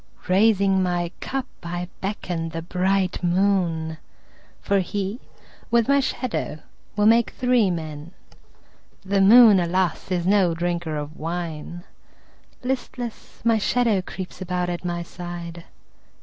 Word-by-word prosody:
Raising 195 0 +4
my 175 -2 -1
cup 270 -1 -3 0.2
I 175 +1 -4
beckon 180 -4 -3
the 165 0 -5
bright 185 +1 0
moon, 175 -3 +1 0.6
For 200 -1 +1
he, 200 +4 -3 0.5
with 235 -1 +3
my 280 0 +4
shadow, 255 - -2 0.4
will 210 0 +2
make 230 +1 +5
three 250 -5 +2
men. 155 -2 -5 1.0
The 195 0 +2
moon, 215 0 +8
alas, 175 0 0
is 175 -2 -1
no 190 -3 +3
drinker 170 -2 -2
of 150 +2 -6
wine; 170 0 -5 0.8
Listless, 250 -2 -5
my 230 -1 +4
shadow 225 -2 +2
creeps 185 +1 -8
about 180 -1 -1
at 175 - -5
my 175 -1 -2
side. 170 -1 -8
185 Hz, 120 wpm, -23 LUFS, 170-205 Hz, 1.0 s, moon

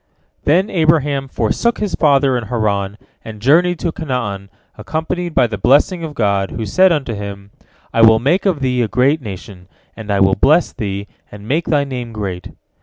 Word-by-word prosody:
" - - -46
Then 180 +8 +2
Abraham 150 -5 +1
forsook 130 - -1
his 210 -3 -3
father 140 -3 +3
in 120 -2 -2
Haran, 105 -4 -2 0.3
and 110 -2 -9
journeyed 170 +9 +3
to 170 - -1
Canaan, 115 -11 -4 0.3
accompanied 160 +8 -4
by 125 - +4
the 110 -3 -5
blessing 165 +6 +3
of 155 -2 -6
God, 100 -3 0
who 115 - -5
said 185 - +4
unto 135 -7 -1
him, 100 -1 -8 0.4
"I 115 - +2
will 110 0 +7
make 145 - +1
of 165 -7 0
thee 125 -2 0
a 115 - +1
great 130 +7 +1
nation, 95 -4 -9 0.3
and 110 -2 -10
I 100 -1 +1
will 95 0 +4
bless 155 - +3
thee, 100 -3 -4 0.3
and 105 0 -11
make 155 +7 0
thy 145 -3 +2
name 125 -4 -6
great." 95 -5 -5
125 Hz, 185 wpm, -17 LUFS, 105-155 Hz, 0.4 s, will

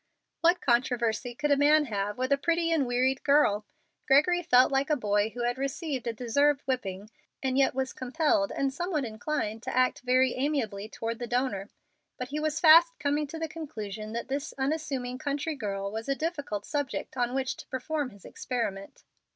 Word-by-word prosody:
What 345 +2 +3
controversy 240 -1 +1
could 295 +2 -1
a - - +6
man 295 +2 +4
have 205 -3 -3
with 255 +2 -2
a - - +7
pretty 335 +2 +1
and 300 -6 +2
wearied 255 +2 +1
girl? 215 -8 +3 0.4
Gregory 305 +6 +4
felt 255 -6 +5
like 270 +1 +1
a 300 - +3
boy 210 -4 +1
who 240 +2 -5
had 245 +2 -1
received 275 -2 -3
a - - +1
deserved 275 +5 +1
whipping 210 -6 -3 0.3
and 260 -1 0
yet 270 -1 +3
was 265 0 -2
compelled 295 +4 +1
and 275 -1 -1
somewhat 320 -2 -2
inclined 225 -1 -3
to 255 +1 -4
act 255 0 +3
very 255 0 +3
amiably 235 -7 -2
toward 230 0 -4
the 240 - -4
donor. 235 -5 -1 0.5
But 250 -1 -5
he 295 +2 -3
was 305 -1 -1
fast 330 +1 +7
coming 295 +1 0
to 325 - -7
the 320 0 -2
conclusion 220 -10 -6
that 235 - -4
this 275 +2 -4
unassuming 265 -3 -2
country 290 +2 -2
girl 200 -6 -4
was 225 +4 -5
a 275 - +2
difficult 290 - -3
subject 285 -3 -3
on 245 0 -1
which 265 -1 -1
to - - -11
perform 285 +2 -2
his 200 -4 -17
experiment. 205 -6 -4
260 Hz, 185 wpm, -28 LUFS, 235-295 Hz, 0.5 s, a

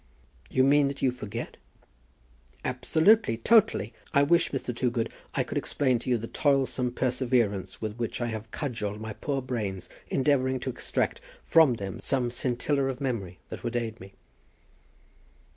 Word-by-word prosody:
"You 130 - +3
mean 140 +1 +5
that 140 0 -5
you 130 - +4
forget?" 115 -2 -6 1.1
"Absolutely; 190 - +3
totally. 220 - +3 0.2
I 140 - +6
wish, 170 +4 +3
Mr. 130 -3 -3
Toogood, 120 -2 -1 0.2
I - - +2
could - - -2
explain 130 -4 +1
to 125 - -6
you 125 - +3
the 115 - -5
toilsome 130 -2 +1
perseverance 120 -7 0
with 110 0 -4
which 115 -2 -3
I 120 - -1
have 110 -1 -5
cudgelled 105 -6 -4
my 110 0 -5
poor 135 +3 -3
brains, 105 -8 -3 0.2
endeavouring 130 -1 +2
to 130 - -2
extract 125 - -2 0.2
from 160 -6 +5
them 100 -5 -5
some 125 -3 0
scintilla 130 +3 0
of 135 -1 -2
memory 110 -10 -3
that - - -7
would 120 0 -3
aid 115 -2 -2
me." 95 +1 -12
125 Hz, 155 wpm, -28 LUFS, 110-135 Hz, 1.1 s, I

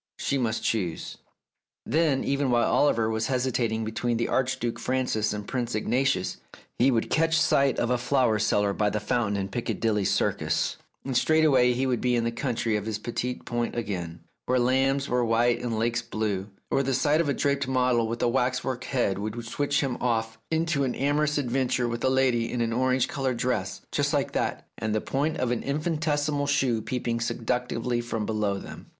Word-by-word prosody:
She 140 - -1
must 115 -3 -1
choose... 90 -8 -2 0.7
Then, 155 -3 +2
even 140 -1 0
while 120 -1 +3
Oliver 115 -6 +3
was 110 0 -1
hesitating 125 -4 0
between 115 +2 -1
the 115 - -1
Archduke 125 -2 -1
Francis 125 -5 0
and 105 -1 -5
Prince 120 -3 -2
Ignatius, 120 -1 0 0.4
he 130 - +5
would 115 -4 0
catch 165 0 +3
sight 140 -4 +3
of 120 - 0
a 125 - +2
flower 125 -4 +2
seller 105 -1 +2
by 105 +1 +1
the 105 - -1
fountain 105 -1 0
in 95 -1 -2
Picca 115 +5 -3
dilly 105 -3 +1
Circus, - - 0 0.3
and 135 -2 -3
straightway 135 -3 +4
he 130 +2 0
would 125 -3 0
be 125 -1 +2
in 120 - +1
the 115 - 0
country 115 -2 -1
of 105 0 -2
his 110 -1 -2
petit 120 +3 -4
point 120 -1 -2
again, 90 -7 -4 0.3
where 130 - +2
lambs 135 +3 +2
were 125 0 +1
white 120 +1 +2
and 115 -2 -2
lakes 120 +2 0
blue; 110 -4 -3 0.2
or - - +3
the 135 -1 0
sight 150 +4 +3
of 155 - -1
a - - +2
draped 140 -1 0
model 125 -3 +2
with 115 +1 -3
a - - +4
waxwork 125 +1 0
head 110 -7 0
would 110 +3 -4
switch 145 +5 0
him 135 -4 -1
off 115 -2 -1
into 160 -3 +1
a - - +1
new 125 - -3
amorous 150 +2 +1
adventure 125 -2 0
with 120 0 -4
a 130 - +3
lady 125 -3 +2
in 125 - -2
an 115 -1 0
orange 130 +1 +2
coloured 130 -3 -2
dress, 125 +1 -1
just - - 0
like - - 0
that, - - -2
and 110 -1 -1
the - - +2
point 150 +8 -1
of 125 -3 0
an 120 - -1
infinitesimal 150 -1 -1
shoe 130 -5 +1
peeping 115 +1 -2
seductively 120 0 -1
from 115 -2 -3
below 105 -2 0
its 95 - -7
hem. - - -10
120 Hz, 195 wpm, -26 LUFS, 115-135 Hz, 0.7 s, he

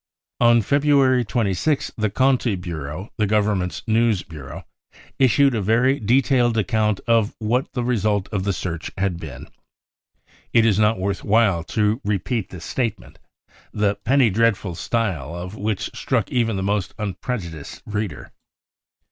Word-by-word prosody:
" - - -70
On 120 -1 +4
February 140 -1 +3
26th 115 - 0
the 110 -1 0
Conti 130 -1 +2
Bureau, 85 +1 -6
the 105 -2 +1
Government's 100 -3 0
news 110 -3 +2
ffiureau, 75 -5 -9 0.6
issued 135 +1 +4
a 110 - 0
very 120 +7 +2
detailed 120 +1 +2
account 105 0 +1
of 115 -2 +2
what 120 +4 -1
the 125 - -2
result 105 -5 0
of 100 -3 -1
the 100 - 0
search 85 -3 -4
had 95 -3 -1
been. 70 -6 -9 1.1
It 115 -1 +5
is 105 -3 +3
not 105 0 +3
worth 95 +1 -2
while 100 -6 +3
to' 105 +5 0
repeat 105 +2 -1
this 85 -2 -9
statement, 110 -7 -3 0.5
the 105 -1 +1
penny 130 0 +2
dreadful 105 -3 +1
style 85 - -2
of 90 +2 -6
which 105 -1 -3
struck - - -1
even 115 -3 +1
the 95 - -2
most 100 -1 -1
unprejudiced 90 - -5
reader. 105 -1 -4
105 Hz, 145 wpm, -22 LUFS, 95-120 Hz, 1.1 s, It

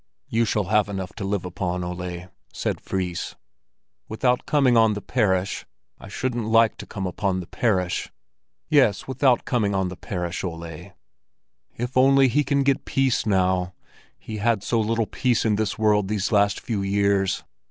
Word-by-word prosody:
"You 115 +1 +2
shall 105 -1 0
have 105 +2 +2
enough 95 -2 -5
to - - -6
live 100 -1 -2
upon, 90 0 -3
Ole," 90 0 -5 0.3
said - - -3
Fris. 90 -2 -3 0.7
"Without 125 +3 0
coming 135 -5 +3
on 110 -2 +4
the - - -3
parish? 95 -5 0 0.4
I - - -11
shouldn't 120 +1 -3
like 115 0 +4
to - - -9
come 95 -2 -5
upon 95 +1 -1
the 90 - -6
parish." 90 -4 -1 0.6
"Yes, 130 -10 +3
without 130 -2 +2
coming 105 -5 0
on 95 -1 0
the 90 - -7
parish, 90 -3 -4
Ole." 85 +1 -7 0.8
"If 120 +2 -4
only 135 +1 +5
he 150 +5 +2
can 140 0 +1
get 135 -1 +1
peace 135 -4 0
now! 95 -2 +1 0.4
He 110 - -7
had 110 -1 +1
so 115 - +1
little 115 +1 +1
peace 120 +1 0
in 105 -2 +3
this 105 -1 -1
world 105 -2 +2
these 100 0 -1
last 100 -1 +3
few 110 -4 -3
years. 100 -1 +1
105 Hz, 165 wpm, -24 LUFS, 95-115 Hz, 0.8 s, only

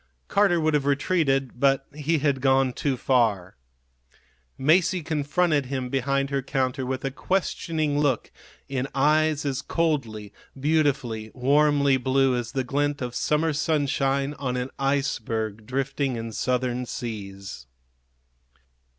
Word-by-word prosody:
Carter 195 -4 +3
would 155 -1 +1
have 145 -2 +1
retreated, 140 -4 +1
but 135 0 +3
he 150 +2 0
had 140 -2 0
gone 135 -1 +3
too 135 -1 -1
far. 110 -9 +1 1.0
Masie 170 +4 +3
confronted 150 -1 +1
him 130 -1 -3
behind 140 +1 0
her 140 0 0
counter 130 -1 -1
with 130 +1 -3
a 135 - -1
questioning 155 -2 -1
look 140 -5 0 0.4
in 135 -1 -2
eyes 150 +2 +2
as 140 -1 -1
coldly, 120 -12 -2 0.3
beautifully, 140 -7 0
warmly 140 +1 +3
blue 130 0 +2
as 120 0 -4
the 135 -2 0
glint 145 +2 -1
of 125 -2 -4
summer 155 +3 +1
sunshine 140 -2 0
on 125 -2 -2
an 125 +1 -3
iceberg 115 -6 -1
drifting 135 0 -1
in 115 0 -5
Southern 125 +1 -1
seas. 100 - -7
135 Hz, 125 wpm, -25 LUFS, 125-145 Hz, 1.0 s, Carter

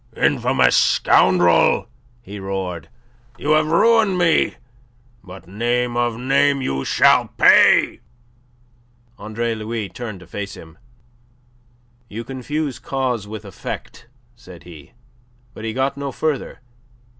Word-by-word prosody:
"Infamous - - +2
scoundrel!" 90 -2 +3 0.4
he 100 -1 -9
roared. 95 -3 -5 0.5
"You 150 - -2
have 155 0 +3
ruined 210 +3 +3
me! 170 -2 +2 0.7
But, 95 -1 -13
name 120 +5 -1
of 120 -1 0
a - - -10
name, 140 +3 +2
you 65 - -3
shall - - +3
pay!" - - +5 1.2
Andre 115 +2 -3
Louis 110 -1 -5
turned 110 -2 -8
to - - -13
face 100 -1 -7
him. 80 0 -15 1.3
"You 115 +3 -6
confuse 135 +1 -4
cause 125 -6 -3
with 110 0 -8
effect," 100 +4 -8 0.3
said 95 -8 -15
he. 80 -5 -14 0.6
But 110 - -9
he 110 - -2
got 130 +3 -1
no 140 -1 -4
farther... 150 -1 -3
115 Hz, 120 wpm, -20 LUFS, 95-135 Hz, 1.3 s, pay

